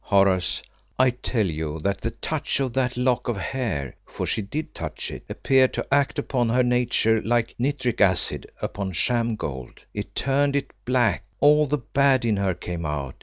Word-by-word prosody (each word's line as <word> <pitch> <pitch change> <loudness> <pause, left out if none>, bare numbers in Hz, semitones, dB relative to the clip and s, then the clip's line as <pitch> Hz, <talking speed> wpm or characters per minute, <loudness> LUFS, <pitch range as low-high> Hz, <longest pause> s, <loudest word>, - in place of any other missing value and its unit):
"Horace, 95 -3 +2 0.3
I 130 0 +5
tell 120 -2 -1
you 80 -2 -3
that 100 +3 -1
the - - -1
touch - - -2
of 130 -3 -1
that 125 -1 0
lock 125 0 +1
of 120 -4 -1
hair 100 - -3
for - - -4
she - - 0
did 145 +11 -5
touch - - -5
it - - -8
appeared 130 -1 +3
to - - -2
act 140 +1 +2
upon 125 -5 0
her 125 +2 +3
nature 120 -2 +2
like 120 0 0
nitric 130 -2 0
acid 90 -3 +1
upon 95 -1 -3
sham 115 +5 +1
gold. 65 - -6
It - - -6
turned 140 +1 +1
it 140 - -2
black; 125 -2 +2 0.2
all 150 +1 +5
the 150 +2 +1
bad 135 -1 +2
in 110 -3 +2
her 95 -2 0
came 85 -1 -5
out. 75 -4 -3
120 Hz, 180 wpm, -24 LUFS, 95-130 Hz, 0.3 s, I